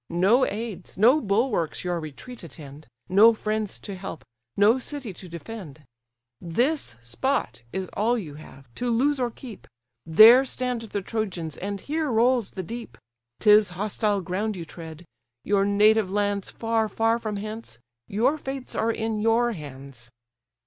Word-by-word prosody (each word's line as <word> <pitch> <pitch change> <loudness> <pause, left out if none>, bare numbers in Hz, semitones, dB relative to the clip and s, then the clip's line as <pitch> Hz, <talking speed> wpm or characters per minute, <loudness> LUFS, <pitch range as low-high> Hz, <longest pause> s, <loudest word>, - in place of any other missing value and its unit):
No 200 +10 +3
aids, 210 -4 -6
no 250 +10 +5
bulwarks 200 - 0
your 175 -1 -1
retreat 165 - -9
attend, 150 -2 -11 0.2
No 215 +5 +6
friends 215 -1 -3
to 200 - -7
help, 180 -7 -8 0.3
no 215 +5 +5
city 260 -5 -5
to 180 +1 -11
defend. 170 -4 -9 0.6
This 240 - -1
spot 115 - -2
is 190 -1 -3
all 230 +4 +1
you 165 -10 -6
have, 135 -4 -14
to 245 - -3
lose 270 +5 +2
or 245 -1 0
keep; 235 -2 -11 0.4
There 220 +10 +9
stand 250 -2 -3
the 205 -3 -5
Trojans, 185 -8 -3
and 200 0 -5
here 310 0 -2
rolls 235 -1 +2
the 185 - -6
deep. 205 - -8 0.4
'Tis 210 -1 +6
hostile 205 0 0
ground 200 +5 -2
you 170 -2 -6
tread; 165 0 -10 0.4
your 200 -1 +2
native 210 0 +4
lands 205 0 -1
Far, 225 -1 -1
far 225 +2 +1
from 215 -2 -4
hence: 215 - -7 0.3
your 250 +10 +1
fates 270 -2 -6
are 225 - 0
in 220 -1 -2
your 225 +2 +2
hands." 135 - -10
210 Hz, 150 wpm, -25 LUFS, 175-230 Hz, 0.6 s, There